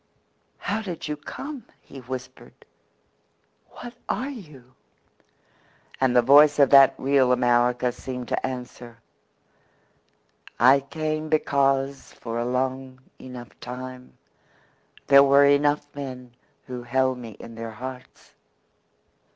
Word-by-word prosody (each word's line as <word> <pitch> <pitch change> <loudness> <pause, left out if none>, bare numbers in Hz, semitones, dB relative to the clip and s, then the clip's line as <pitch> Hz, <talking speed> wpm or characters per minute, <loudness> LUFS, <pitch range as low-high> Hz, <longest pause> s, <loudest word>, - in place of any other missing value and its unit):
"How 215 +2 -3
did 180 -8 -6
you 150 - -3
come?" 270 - -8 0.2
he 135 - -13
whispered. 125 0 -9 1.0
"What 240 -1 -10 0.2
are 270 +3 -2
you?" 150 - -13 1.3
And 130 -2 +2
the 125 - +5
voice 145 +3 +6
of 140 -3 +4
that 135 -1 +7
real 135 -1 +2
America 125 0 +2
seemed 125 0 -7
to - - -2
answer: 125 -2 -7 1.6
"I 130 +4 +6
came 155 +2 -4
because 140 -2 0
for 115 0 -6
a 120 - -2
long 130 +1 -3 0.2
enough 125 -3 -11
time 125 +1 -9 0.9
there 140 0 +7
were 140 +1 +5
enough 145 +1 +2
men 125 -3 -8 0.3
who 125 -1 -7
held 130 +1 0
me 115 -4 -10
in 115 - -10
their 115 0 -7
hearts. 130 +3 -10
130 Hz, 115 wpm, -24 LUFS, 125-140 Hz, 1.6 s, that